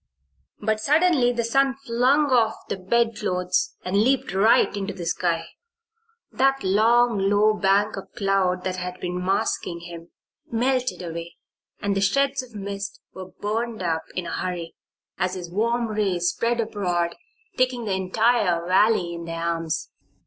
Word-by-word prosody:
But 215 0 0
suddenly 295 0 +3
the 235 -1 -1
sun 270 +3 +2
flung 260 +5 +2
off 225 -3 +3
the - - -1
bedclothes 185 -3 0
and 185 +2 -2
leaped 260 -2 +1
right 200 +1 +4
into 200 0 -4
the 175 -3 -6
sky. 165 -1 0 0.9
That 270 +1 +2
long, 225 +3 +3
low 210 +1 +4
bank 205 +1 +2
of 195 - -8
cloud 195 -4 +1
that 185 0 -2
had 180 0 -5
been 180 0 -3
masking 180 -2 -1
him, 170 0 -10 0.4
melted 255 -2 0
away 170 0 -6 0.5
and 200 -1 0
the 195 - 0
shreds 275 +7 +2
of 245 -3 -14
mist 200 0 -5
were 185 -1 -8
burned 220 +2 -3
up 165 -2 -1
in 180 - -3
a - - -5
hurry 175 -2 -4 0.5
as 185 0 0
his 175 -2 -7
warm 235 +4 0
rays 195 -5 0
spread 235 +5 -1
abroad, 180 -6 -1 0.4
taking 255 -2 0
the 200 - -1
entire 190 -2 +1
valley 185 -1 +3
in 170 0 -6
their 165 0 -5
arms. 165 -2 -2
200 Hz, 150 wpm, -24 LUFS, 180-235 Hz, 0.9 s, right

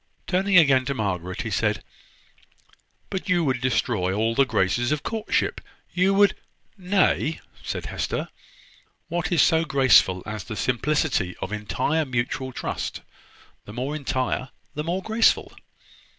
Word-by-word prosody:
Turning 190 +1 +2
again 140 -6 +6
to 140 +1 -3
Margaret, 90 -5 -3
he - - -4
said: - - 0 1.3
"But 190 +1 -4
you 175 -2 +3
would 130 -5 0
destroy 115 -7 0
all 110 +3 +1
the 135 +3 +3
graces 120 +5 +1
of 150 -1 -1
courtship: 220 -2 -1 0.3
you 185 +2 +3
would 200 0 +5 0.3
" - - -40
"Nay," 185 -5 +1 0.2
said - - -4
Hester, - - -3 0.8
"what 175 +4 -2
is 170 -4 +5
so 165 -1 +3
graceful 130 - +4
as 105 -3 -5
the 110 - -6
simplicity 125 - 0
of 95 - -5
entire 130 +9 0
mutual 130 +1 -2
trust? - - -4 0.6
the 105 - -10
more 130 +5 -3
entire 130 -3 -2 0.2
the 150 - -3
more 175 +4 -2
graceful." 220 +1 +2
135 Hz, 140 wpm, -24 LUFS, 115-170 Hz, 1.3 s, again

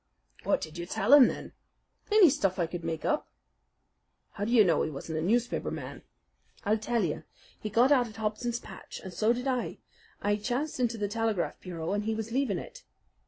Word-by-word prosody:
"What - - +1
did 155 +2 -7
you 170 - -5
tell 205 +8 +2
him, 285 -4 +10
then?" - - -5 0.6
"Any 410 -8 +7
stuff 195 -10 0
I 175 - +1
could 170 +1 -6
make 165 -1 -3
up." - - 0 1.0
"How 205 - -4
do 230 - -2
you 235 -3 +7
know 175 -4 +3
he - - 0
wasn't 155 +2 -5
a - - -2
newspaper 235 +8 +1
man?" - - -6 0.6
"I'll 215 +2 +2
tell 230 0 0
you. 155 -4 -2 0.4
He 215 - -4
got 240 +6 +4
out 250 -4 +4
at 220 - -12
Hobson's 225 +2 -2
Patch, - - -10
and 190 -2 -7
so 215 +5 +2
did 250 +2 -2
I. 255 -2 -1 0.4
I 205 0 +1
chanced 255 +7 -2
into 235 -2 +1
the 205 -1 -1
telegraph 220 -3 -1
bureau, 170 -1 -4
and 205 0 -1
he 220 0 0
was 220 +1 -4
leaving 245 -6 +1
it. - - -9
220 Hz, 205 wpm, -29 LUFS, 185-245 Hz, 1.0 s, him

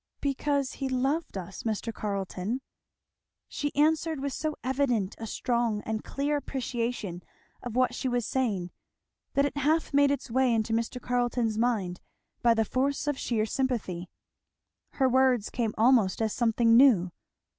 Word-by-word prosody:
"Because 280 -1 0
he 270 -1 -4
loved 270 +1 -1
us, 190 +1 -7
Mr. 225 +1 -2
Carleton." 200 +3 -3 0.9
She 290 0 -3
answered 315 +1 +2
with 275 0 -3
so 310 -1 -2
evident 250 -7 0
a 225 - -5
strong 235 -3 -1
and 220 0 -3
clear 290 +2 -1
appreciation 235 -9 -3 0.4
of 245 -2 -6
what 255 0 +2
she - - -3
was 245 -2 0
saying 205 -9 -1 0.6
that 280 0 +4
it 285 - -3
half 310 +3 +1
made 285 0 +5
its 275 -3 -2
way 255 -1 +3
into 225 0 0
Mr. 230 +2 -1
Carleton's 245 -3 0
mind 210 -7 0 0.4
by 235 -1 +4
the 225 0 +2
force 275 +5 0
of 290 -1 0
sheer 220 -3 0
sympathy. 215 -8 -2 0.8
Her 265 - +2
words 255 -4 +3
came 230 -3 -1
almost 225 -4 +4
as 220 -2 0
something 230 -1 +3
new. 230 -9 +6
245 Hz, 150 wpm, -28 LUFS, 220-270 Hz, 0.9 s, new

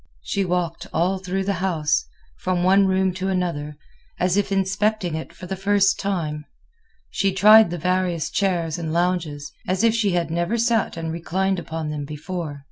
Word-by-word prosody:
She 200 - -1
walked 175 -2 -2
all 185 +3 +1
through 190 +1 -2
the 190 -2 -2
house, 160 -6 +1 0.3
from 180 -1 0
one 195 +2 +5
room 190 0 +1
to 185 +1 -3
another, 165 -6 -2 0.4
as 180 0 +2
if 205 0 0
inspecting 195 -1 0
it 160 0 -5
for - - -11
the 190 +2 -4
first 200 +1 +2
time. 160 -7 -2 0.7
She 195 -1 +1
tried 210 +2 +7
the 175 - -4
various 180 -1 0
chairs 175 -5 0
and 160 -2 -3
lounges, 165 -4 -1 0.2
as 185 +3 0
if 230 -1 +4
she 215 -5 +1
had 170 -2 0
never 175 +7 0
sat 230 -5 +1
and 165 -1 -3
reclined 190 +3 -1
upon 160 -2 -4
them 145 -1 -4
before. 155 0 -5
180 Hz, 175 wpm, -23 LUFS, 165-195 Hz, 0.7 s, tried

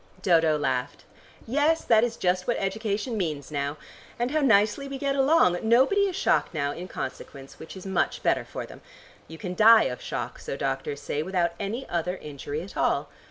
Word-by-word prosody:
Dodo 165 -4 +4
laughed. 125 -4 -2 0.4
"Yes, 295 +6 +2
that 225 -1 +4
is 235 -1 -1
just 180 0 0
what 240 - +1
education 210 +3 -2
means 155 -7 -3
now. 145 0 -2 0.4
And 240 +2 -1
how 310 0 +1
nicely 225 +2 +3
we 275 0 -5
get 275 0 -1
along. 270 - +4
Nobody 265 - +4
is 370 - -4
shocked 380 - +1
now, 140 -2 0
in 175 +5 -7
consequence, 135 -6 -8
which 160 +4 -10
is 190 - -10
much 190 -2 -1
better - - +2
for - - -7
them. - - -13 0.5
You 160 - -10
can 180 +1 -5
die 220 +3 +7
of 125 - -3
shock, - - -5
so - - -5
doctors 140 - -3
say, 145 - -2
without 175 0 0
any 220 +6 -4
other 175 +2 -2
injury 145 +1 -6
at 195 - -11
all. - - 0
195 Hz, 190 wpm, -26 LUFS, 160-240 Hz, 0.5 s, die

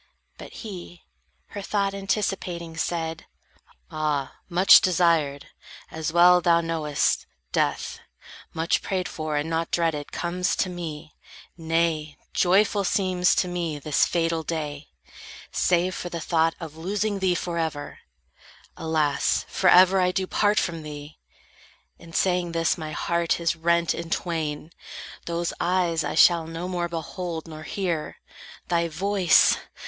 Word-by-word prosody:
But - - -10
he, 180 -4 -9 0.5
her 205 - -6
thought 200 0 -1
anticipating, 195 -4 -3
said: 165 0 -3 0.6
"Ah, 150 -3 -2
much 185 +2 +7
desired, 165 -6 +1 0.4
as 160 -1 -3
well 175 +1 +6
thou 170 -1 +4
knowest, 160 -3 0 0.2
death, - - -1 0.5
Much 165 +1 0
prayed 185 -2 -2
for, 155 -1 -4
and 145 +2 -1
not 165 0 -1
dreaded, 160 -4 -1
comes 180 +1 -1
to 185 - -1
me; 160 -3 -7 0.4
Nay, 165 -2 -1 0.2
joyful 200 +2 +3
seems 185 -2 +2
to 180 - +1
me 170 -4 -3
this 145 0 +1
fatal 165 -1 0
day, 150 -2 -4 0.6
Save 180 +1 +1
for 175 - -5
the 170 - -5
thought 165 0 +1
of 160 -3 -8
losing 200 +5 -2
thee 185 -2 +2
forever; 160 -4 -3 0.8
Alas, 155 -3 0
forever 185 0 +5
do 190 +1 -1
I - - -2
part 205 +2 +1
from 165 -2 0
thee! 150 0 -9 0.8
In 170 - -13
saying 180 -1 0
this 165 0 +1
my 155 -3 -6
heart 170 +2 0
is 170 0 0
rent 170 0 +1
in 170 0 -6
twain. 160 -3 -3 0.6
Those 170 0 -2
eyes 175 -2 +1
I - - -3
shall 170 -2 +5
no 165 +2 -5
more 175 -1 -2
behold, 165 0 -5
nor 155 -1 -9
hear 170 -1 -3 0.5
Thy 170 -1 +1
voice. 185 +2 +3
170 Hz, 135 wpm, -25 LUFS, 160-180 Hz, 0.8 s, much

